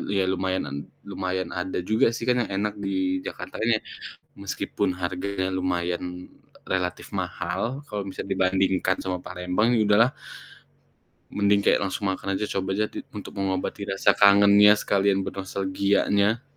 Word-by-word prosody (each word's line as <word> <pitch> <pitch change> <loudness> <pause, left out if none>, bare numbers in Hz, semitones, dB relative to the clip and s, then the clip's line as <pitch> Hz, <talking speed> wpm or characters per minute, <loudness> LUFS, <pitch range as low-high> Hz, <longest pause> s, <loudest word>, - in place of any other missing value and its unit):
iya 95 - +3
lumayan 95 0 -1
nan 70 0 -5 0.3
lumayan 95 -2 -3
ada 90 0 -3
juga 110 +4 +3
sih, - - -6
kan 125 +1 +2
yang - - -3
enak 105 +1 -1
di 95 -2 -1
Jakarta - - -7
ini, 115 -1 +2 0.6
meskipun 95 -2 -2
harganya 95 +1 -2
lumayan 90 0 -3 0.3
relatif 90 -1 -3
mahal, 115 +11 -3
kalo 105 -1 -4
misalnya 95 +1 -5
dibandingkan 95 0 +2
sama 90 -1 -2
Palembang 95 +6 0
ya 110 - +3
udahlah, 110 +5 +5 1.2
mending 100 0 +3
kayak - - +4
langsung 95 0 -2
makan 95 +1 -3
aja 105 - -1
coba 95 0 -1
aja 105 - +2
di - - -6 0.2
untuk 105 - -7
mengobati 95 +1 -2
rasa 95 0 +3
kangennya 100 +1 +7
sekalian 100 -1 +1
bernostalgianya. 100 +3 0
95 Hz, 140 wpm, -25 LUFS, 95-100 Hz, 1.2 s, kangennya